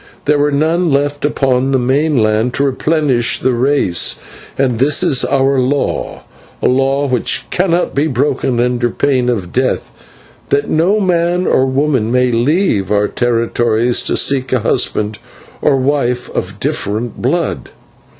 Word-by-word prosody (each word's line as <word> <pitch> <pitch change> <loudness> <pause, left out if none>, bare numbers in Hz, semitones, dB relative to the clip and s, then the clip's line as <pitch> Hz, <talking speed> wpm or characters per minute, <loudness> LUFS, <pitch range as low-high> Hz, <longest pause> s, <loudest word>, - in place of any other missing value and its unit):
There 150 0 +2
were 145 +1 +1
none 160 +4 +1
left 145 +1 0
upon 135 -2 0
the - - +3
mainland 125 -4 +1
to 140 - +1
replenish 140 -2 +1
the 130 - 0
race, 120 -8 +1 0.4
and 125 -4 0
this 140 +3 +2
is 130 - +2
our 135 0 +1
law, 135 +3 -2 0.4
a - - 0
law 135 +2 +1
which 125 -3 0
cannot 180 -1 0
be 145 +3 +1
broken 130 -2 -1
under 120 0 0
pain 130 0 0
of 95 -8 -3
death, 130 +1 -1 0.6
that 140 0 +1
no 180 +7 +1
man 180 -1 0
or 130 - +2
woman 130 -4 0
may 125 0 +2
leave 120 - 0
our 105 0 +2
territories 120 0 0
to - - -1
seek 135 -2 0
a 130 - +1
husband 105 -1 -1 0.4
or - - +3
a - - +2
wife 130 -2 -1
of 100 +2 -4
different 120 -6 -3
blood. 165 +7 -2
130 Hz, 150 wpm, -14 LUFS, 120-145 Hz, 0.6 s, the